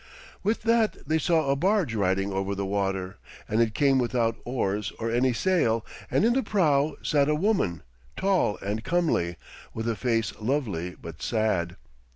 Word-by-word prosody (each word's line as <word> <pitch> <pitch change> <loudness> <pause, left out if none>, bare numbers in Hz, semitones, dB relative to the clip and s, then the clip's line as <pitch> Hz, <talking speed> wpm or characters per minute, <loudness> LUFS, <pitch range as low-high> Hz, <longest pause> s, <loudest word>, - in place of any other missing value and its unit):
With 215 +3 -1
that 230 -7 +1
they 160 +1 +2
saw 160 -3 +2
a - - +3
barge 180 - +1
riding 95 -1 0
over 95 +1 -1
the 100 0 -2
water, 95 -2 -2 0.3
and 110 +2 +1
it 110 -2 +1
came 135 -2 +3
without 120 -2 +1
oars 105 -5 -1
or 115 0 -2
any 125 +2 +2
sail, 120 - +1 0.2
and - - +2
in 235 - +4
the 265 - +2
prow 155 - +2
sat 145 -1 +2
a 150 - +3
woman, 155 - 0 0.3
tall 190 - +1
and 105 +3 -2
comely, 155 - +1 0.4
with 110 +1 -3
a 115 - 0
face 115 -1 0
lovely 105 - -2
but 85 -1 -10
sad. 100 -7 0
115 Hz, 170 wpm, -26 LUFS, 100-155 Hz, 0.4 s, in